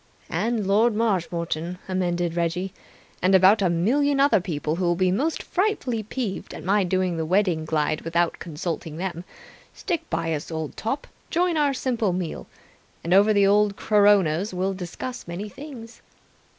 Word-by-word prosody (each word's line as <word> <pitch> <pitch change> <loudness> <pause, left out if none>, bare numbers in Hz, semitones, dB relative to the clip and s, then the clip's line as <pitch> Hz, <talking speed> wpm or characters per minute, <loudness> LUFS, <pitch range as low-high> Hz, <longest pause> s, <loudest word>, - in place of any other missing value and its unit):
"And 215 +5 0
Lord 215 +4 +3
Marshmoreton," 175 -5 -1
amended 175 -2 -1
Reggie. 175 +3 -1 0.5
"And 190 +1 +4
about 190 +3 +6
a 185 - +3
million 275 +12 +2
other 275 -8 +4
people 155 -3 -3
who'll 175 -1 +1
be 185 +1 +2
most 290 - -1
frightfully 360 - -1
peeved 215 -1 -5
at - - -8
my 200 +2 +2
doing 185 -1 0
the 160 - -1
Wedding 175 -2 +1
Glide 155 -1 0
without 170 +1 0
consulting 160 -1 -5
them. 175 -1 -4 0.5
Stick 345 -5 -3
by 165 0 -1
us, 150 +1 -4
old 160 -2 -4
top. 270 +6 -3 0.2
Join 350 0 +1
our 290 -3 +2
simple 235 -7 0
meal. 175 -3 -4 0.6
And 170 - 0
over 200 +3 +6
the 200 -1 +4
old 205 0 +3
coronas 200 -4 +3
we 180 - -3
will 195 +1 +1
discuss 190 +7 -6
many 175 +5 -5
things." 245 -2 -10
190 Hz, 160 wpm, -24 LUFS, 170-220 Hz, 0.6 s, about